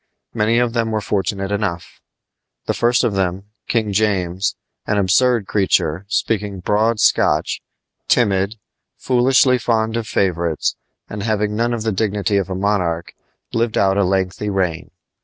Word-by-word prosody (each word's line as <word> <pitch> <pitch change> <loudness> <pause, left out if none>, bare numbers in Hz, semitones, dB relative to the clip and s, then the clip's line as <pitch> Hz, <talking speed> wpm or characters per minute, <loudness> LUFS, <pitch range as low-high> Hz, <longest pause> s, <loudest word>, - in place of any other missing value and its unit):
Many 115 +1 +1
of 120 -1 +1
them 115 -2 0
were 110 -1 0
fortunate 100 -1 -2
enough. 100 -5 -3 0.6
The - - 0
first 120 +1 +2
of 120 -4 +1
them, 95 +1 -2 0.2
King 110 -4 0
James, 95 -3 0 0.3
an 105 - +1
absurd 110 +4 +3
creature, 95 -2 0
speaking 105 -3 -1
broad 105 +4 +1
Scotch, - - +2 0.5
timid, 100 -3 +2 0.4
foolishly 125 0 +3
fond 110 -1 0
of 115 -2 -3
favorites, 85 -5 0 0.3
and 105 - -6
having 105 -1 -1
none 120 +2 0
of 115 -2 -2
the 110 - 0
dignity 105 0 0
of 95 -1 -1
a 95 - -3
monarch, 90 -4 -1 0.4
lived 115 -1 0
out 95 -1 +3
a 100 - +2
lengthy 95 +2 -1
reign. 90 -4 -1
105 Hz, 145 wpm, -19 LUFS, 95-115 Hz, 0.6 s, absurd